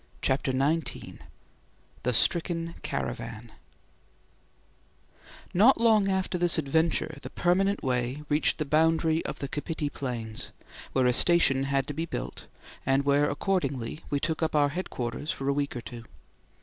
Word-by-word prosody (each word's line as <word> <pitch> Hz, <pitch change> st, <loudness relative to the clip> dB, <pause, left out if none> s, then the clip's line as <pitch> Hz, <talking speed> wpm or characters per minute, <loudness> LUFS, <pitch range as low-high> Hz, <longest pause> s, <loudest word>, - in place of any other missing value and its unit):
CHAPTER 130 Hz, 0 st, +1 dB
XIX 145 Hz, +5 st, -1 dB, 0.8 s
THE 125 Hz, -, 0 dB
STRICKEN 165 Hz, -, +1 dB
CARAVAN 115 Hz, 0 st, -4 dB, 2.0 s
Not 225 Hz, +8 st, +6 dB
long 220 Hz, -3 st, +4 dB
after 190 Hz, -1 st, 0 dB
this 175 Hz, -1 st, +2 dB
adventure 160 Hz, 0 st, 0 dB
the -, -, -7 dB
permanent 195 Hz, +3 st, +1 dB
way 125 Hz, +2 st, -1 dB
reached 150 Hz, +1 st, +2 dB
the 155 Hz, -, -2 dB
boundary 160 Hz, +2 st, +2 dB
of -, -, -4 dB
the 140 Hz, -, -4 dB
Kapiti 145 Hz, +1 st, -3 dB
Plains, 115 Hz, -6 st, -4 dB, 0.4 s
where 130 Hz, -1 st, +3 dB
a 125 Hz, -, +4 dB
station 135 Hz, -3 st, +3 dB
had 135 Hz, -1 st, +1 dB
to 145 Hz, -, -5 dB
be 165 Hz, +3 st, -3 dB
built -, -, -6 dB, 0.4 s
and 135 Hz, +1 st, +2 dB
where 145 Hz, +1 st, +3 dB
accordingly 145 Hz, -, -1 dB
we 145 Hz, -, 0 dB
took 160 Hz, +2 st, -1 dB
up 160 Hz, -1 st, 0 dB
our 145 Hz, -1 st, +4 dB
headquarters 145 Hz, -5 st, -4 dB
for 135 Hz, -, -3 dB
a 140 Hz, -, +3 dB
week 140 Hz, -1 st, -2 dB
or 120 Hz, -, -4 dB
two. 120 Hz, 0 st, -9 dB
145 Hz, 145 wpm, -28 LUFS, 135-165 Hz, 2.0 s, Not